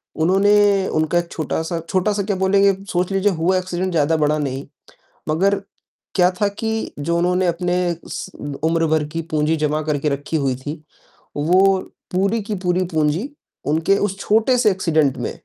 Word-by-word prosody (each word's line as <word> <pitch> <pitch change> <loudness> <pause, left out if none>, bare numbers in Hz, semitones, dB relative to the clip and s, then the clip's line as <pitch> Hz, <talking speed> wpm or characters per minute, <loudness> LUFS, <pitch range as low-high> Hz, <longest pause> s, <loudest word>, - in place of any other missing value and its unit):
उन्होंने 195 +3 +3
उनका 155 +2 0
1 170 0 -5
छोटा-सा, 160 +2 -2
छोटा-सा 200 +2 +1
क्या 200 -1 -1
बोलेंगे 195 +1 +3 0.2
सोच 180 +2 0
लीजिए 195 +1 +2
हुआ 180 +2 +1
एक्सीडेंट 185 0 -2
ज़्यादा 160 0 +2
बड़ा 150 0 +2
नहीं, 135 -2 -3 0.6
मगर 195 +6 +2 0.6
क्या 180 -1 +5
था 205 - +4
कि 220 +2 -3
जो 170 +4 0
उन्होंने 180 +1 +1
अपने 175 +1 0 0.9
उम्र 165 0 +2
भर 155 -1 +2
की 165 - -2
पूंजी 155 +1 +1
जमा 155 0 0
करके 150 -1 -1
रखी 145 +3 -2
हुई 135 -3 0
थी, 150 +4 -7 0.5
वो 185 +5 +4 0.3
पूरी 200 +5 +1
की 210 0 -3
पूरी 180 +1 +1
पूंजी 160 - 0 0.4
उनके 165 +6 +2
उस 195 -1 -1
छोटे 225 +5 +2
से 220 -4 +4
एक्सीडेंट 155 -7 +1
में, 120 - -3
175 Hz, 160 wpm, -20 LUFS, 155-195 Hz, 0.9 s, क्या